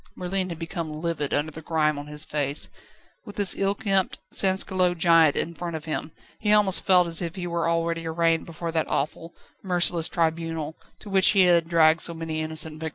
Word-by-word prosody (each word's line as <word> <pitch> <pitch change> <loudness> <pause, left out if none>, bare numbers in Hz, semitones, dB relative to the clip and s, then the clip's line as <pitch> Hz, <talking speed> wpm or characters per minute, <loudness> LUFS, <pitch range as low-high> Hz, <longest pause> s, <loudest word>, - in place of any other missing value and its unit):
Merlin 185 +1 -3
had 170 - -6
become 165 -2 -6
livid 160 -4 -3
under 150 +2 -1
the 160 - -10
grime 155 -2 0
on 145 - -9
his 150 +1 0
face. 145 -1 -1 0.5
With 205 - -11
this 200 -2 +2
ill 195 +1 0
kempt 195 -3 0 0.2
sansculotte 185 -2 +2
giant 165 -3 +4
in 170 - -2
front 170 0 -6
of 155 0 -7
him, 155 0 -4 0.3
he 210 - 0
almost 205 -3 +4
felt 180 -2 +4
as 165 0 +3
if 170 -1 -4
he 180 -2 -5
were 170 -1 -1
already 165 0 -2
arraigned 165 0 0
before 165 0 -6
that 160 -1 -1
awful, 165 +3 -3 0.3
merciless 175 -3 +1
tribunal, 165 -1 -2 0.3
to 210 - -10
which 190 -1 +5
he 195 - +4
had 170 -2 +3
dragged 165 -1 +4
so 170 - +3
many 160 -1 -4
innocent 155 0 -4
victims. 160 0 -4
165 Hz, 200 wpm, -24 LUFS, 160-180 Hz, 0.5 s, which